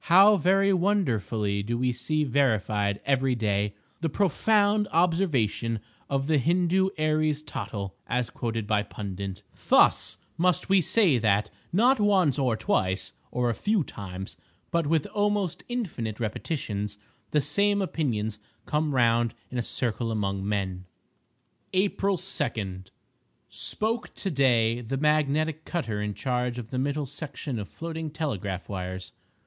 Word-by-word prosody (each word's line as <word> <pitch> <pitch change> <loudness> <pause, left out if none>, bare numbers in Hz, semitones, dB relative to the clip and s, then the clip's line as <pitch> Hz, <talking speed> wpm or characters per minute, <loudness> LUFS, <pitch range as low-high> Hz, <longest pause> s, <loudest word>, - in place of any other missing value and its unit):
How 195 +5 +7
very 195 +2 +3
wonderfully 115 - +1
do 115 +4 -2
we 125 +1 +1
see 150 +6 -1
verified 110 -7 +1
every 135 -2 +2
day, 105 -2 0 0.2
the 165 +1 -1
profound 205 +5 +2
observation 155 - +1 0.3
of 135 -1 0
the 155 0 +3
Hindoo 180 +5 +2
Aries 155 -1 +1
Tottle 105 -8 -5
(as 125 -1 -1
quoted 115 -2 -3
by 105 0 +2
Pundit)—"Thus 100 -2 +1 0.2
must 180 +2 +2
we 195 -1 +5
say 175 - +4
that, 105 -2 +2 0.2
not 240 +8 +4
once 190 -10 +3
or 125 -5 +1
twice, 95 -2 0 0.2
or 125 -1 0
a - - -1
few 205 - +1
times, 95 -5 -7 0.3
but 170 -3 +1
with 160 -1 +2
almost 205 -4 0
infinite 150 - -3
repetitions, 105 -3 -3 0.3
the 150 - +2
same 200 +9 +2
opinions 115 - -1 0.3
come 150 -1 0
round 115 -2 +3 0.2
in 125 - -2
a - - +2
circle 115 0 -1
among 100 -3 -1
men." 95 -3 -2 0.9
April 195 0 +1
2.—Spoke 125 - -4
to 195 - -3
day 120 -5 +3
the 125 +3 -3
magnetic 155 +1 +1
cutter 115 - -2
in 105 -1 -3
charge 125 -2 -1
of 120 -2 -7
the 130 - -1
middle 145 +2 -1
section 140 -2 -5
of 100 - -6
floating 160 -1 -5
telegraph 105 - -3
wires. 95 -1 -5
135 Hz, 130 wpm, -27 LUFS, 110-170 Hz, 0.9 s, How